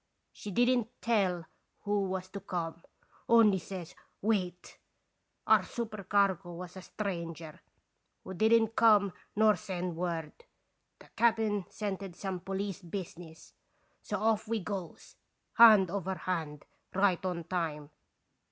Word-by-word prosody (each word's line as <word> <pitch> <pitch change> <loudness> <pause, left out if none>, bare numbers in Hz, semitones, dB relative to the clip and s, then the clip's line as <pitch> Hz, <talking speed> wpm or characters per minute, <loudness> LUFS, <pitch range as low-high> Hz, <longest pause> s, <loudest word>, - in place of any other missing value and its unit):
She 210 - -8
didn't 245 +3 +2
tell 190 -7 +1 0.4
who 205 -1 0
was 185 -1 -3
to 200 - -6
come, 170 -3 -4 0.5
only 220 -4 +6
says 180 -3 -8 0.3
'Wait!' 185 -5 -1 0.7
Our - - +6
supercargo 200 -5 -1
was 180 +1 -8
a 185 - -8
stranger, 170 -5 -5 0.6
who 190 - -7
didn't 220 +3 +4
come 205 -4 +5 0.2
nor 215 0 +5
send 180 -2 -4
word. 165 -2 -3 0.6
The - - -18
cap'n 220 -4 +2
scented 195 -3 -5
some 190 -1 -4
police 195 +1 -4
business; 170 -2 -8 0.5
so - - -3
off 220 0 +1
we 225 0 0
goes, 190 -3 -7 0.4
hand 215 -6 +8
over 190 -1 -2
hand, 160 -6 -4 0.3
right 190 -2 +2
on 180 -2 -2
time. 155 -4 -3
190 Hz, 120 wpm, -31 LUFS, 175-210 Hz, 0.7 s, hand